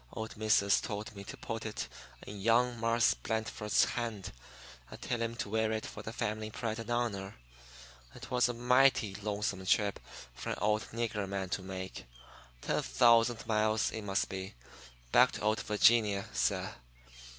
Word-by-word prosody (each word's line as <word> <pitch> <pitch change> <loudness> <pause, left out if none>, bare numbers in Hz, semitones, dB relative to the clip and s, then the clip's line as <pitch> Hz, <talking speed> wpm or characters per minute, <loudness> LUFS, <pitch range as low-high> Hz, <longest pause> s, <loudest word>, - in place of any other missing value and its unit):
Old 110 0 -5
Missus 105 -2 +3
told 105 -1 -5
me 100 - -8
to - - -8
put 115 0 -5
it 105 - -4 0.4
in 100 -1 -8
young 120 +3 +3
Marse 115 0 +3
Blandford's 110 -1 0
hand 115 -5 -4 0.6
and - - -10
tell 120 -2 -2
him 115 0 -2
to 115 - -4
wear 110 +1 0
it 110 0 -2
for - - -8
the 110 - -6
family 110 -2 -3
pride 110 +1 -4
and 115 - -7
honor. 110 -5 -2 0.8
It - - -10
was 125 -1 +3
a - - -1
mighty 125 -3 +3
longsome 105 -1 -3
trip 100 +1 +2 0.3
for - - -6
an - - -2
old 105 +2 +1
nigger 110 -4 -2
man 95 -1 -3
to 95 - -2
make 95 0 -7 0.6
ten - - 0
thousand 115 - +4
miles, 110 0 +1
it 110 - -5
must 100 -1 0
be, 95 -4 -6 0.6
back - - +6
to - - -6
old 110 +1 +1
Vi'ginia, 105 -2 +3
suh. - - 0
110 Hz, 165 wpm, -32 LUFS, 100-115 Hz, 0.8 s, back